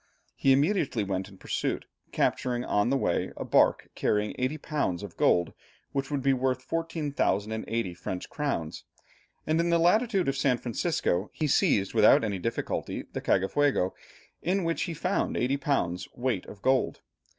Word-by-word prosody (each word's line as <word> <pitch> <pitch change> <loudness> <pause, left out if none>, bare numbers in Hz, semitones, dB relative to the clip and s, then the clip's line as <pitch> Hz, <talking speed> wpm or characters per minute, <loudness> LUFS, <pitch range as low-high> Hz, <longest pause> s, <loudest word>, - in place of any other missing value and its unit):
He 135 - +3
immediately 140 - +2
went 95 -1 -3
in 95 - -15
pursuit, - - -2 0.3
capturing 125 -1 0
on 105 +3 +1
the 135 - +2
way - - 0
a - - -4
bark - - +3
carrying 105 0 0
80 130 +5 0
lbs. 140 - -2
of 100 -5 -8
gold, 85 -1 +2 0.4
which 135 -1 -2
would 145 -3 -2
be 135 0 +4
worth 130 0 0
14,080 115 - -1
French 90 +1 -5
crowns, 140 - -3 0.6
and 155 +1 +1
in 170 +1 +2
the 170 - +4
latitude 195 - +3
of 135 - +1
San 135 -2 +2
Francisco 115 - -1
he 155 - -2
seized 100 -8 +2
without 110 -1 +6
any 100 -4 -1
difficulty 115 +5 -3
the - - -3
Cagafuego, 95 0 +2 0.5
in 190 +2 0
which 165 0 -1
he 170 -3 -5
found 180 +5 -1
80 130 +3 +1
lbs. 90 -12 -1
weight 120 -6 -1
of 100 - -12
gold. 130 0 +1
130 Hz, 160 wpm, -28 LUFS, 105-150 Hz, 0.6 s, without